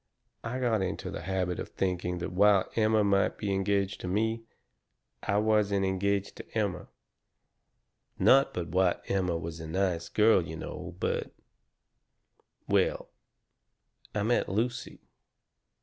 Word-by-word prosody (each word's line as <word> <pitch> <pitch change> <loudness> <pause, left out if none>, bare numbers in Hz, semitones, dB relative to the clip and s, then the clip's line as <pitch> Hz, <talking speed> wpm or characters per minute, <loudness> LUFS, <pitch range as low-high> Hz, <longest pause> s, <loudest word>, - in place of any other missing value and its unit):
I 120 +2 -3
got 120 -5 +1
into 95 - -3
the - - -5
habit 90 0 -2
of - - -5
thinking 90 -1 -2
that 85 - -4
while 100 +1 +4
Emma 110 -1 +3
might 100 -1 +2
be 100 -2 -2
engaged 100 0 0
to - - -5
me, 110 +4 0 0.8
I 100 - 0
wasn't 105 -2 +2
engaged 100 +1 0
to - - -7
Emma. - - -1 1.3
Not 135 +1 +5
but 90 -1 -4
what 90 +1 +1
Emma 90 -3 0
was 80 0 -6
a 80 - -7
nice 85 0 -1
girl, 110 -2 +4
you 80 -1 -6
know, 80 - -7
but - - -2 1.3
"Well, - - +1 1.1
I 105 - 0
met 120 +3 +1
Lucy. 115 +6 -2
100 Hz, 135 wpm, -29 LUFS, 90-105 Hz, 1.3 s, Not